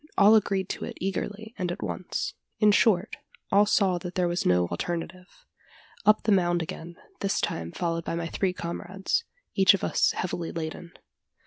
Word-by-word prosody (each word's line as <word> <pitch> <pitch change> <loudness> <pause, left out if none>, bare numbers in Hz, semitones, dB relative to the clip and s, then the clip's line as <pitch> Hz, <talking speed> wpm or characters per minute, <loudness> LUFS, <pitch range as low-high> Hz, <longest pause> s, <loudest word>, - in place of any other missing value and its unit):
All 205 +2 +7
agreed 195 -3 +2
to - - -4
it - - -8
eagerly 205 +3 -4
and 180 -1 -1
at 175 - -5
once: - - -3 0.2
in 210 -1 +5
short, 210 +4 +3 0.3
all 205 +1 +5
saw 190 -4 +2
that 175 0 -7
there 180 -1 +2
was 175 +1 -1
no 90 0 +4
alternative. 180 - -5 0.6
Up 215 0 +5
the 215 - +2
mound 175 -3 +3
again 165 +2 -8 0.2
this 195 -1 0
time 85 0 -2
followed 165 -1 -2
by 165 - -3
my 170 0 -2
three 185 +3 0
comrades 190 - -3 0.3
each 195 0 +6
of - - -6
us - - +2
heavily 175 -2 -3
laden. 165 +1 -6
180 Hz, 175 wpm, -27 LUFS, 170-200 Hz, 0.6 s, All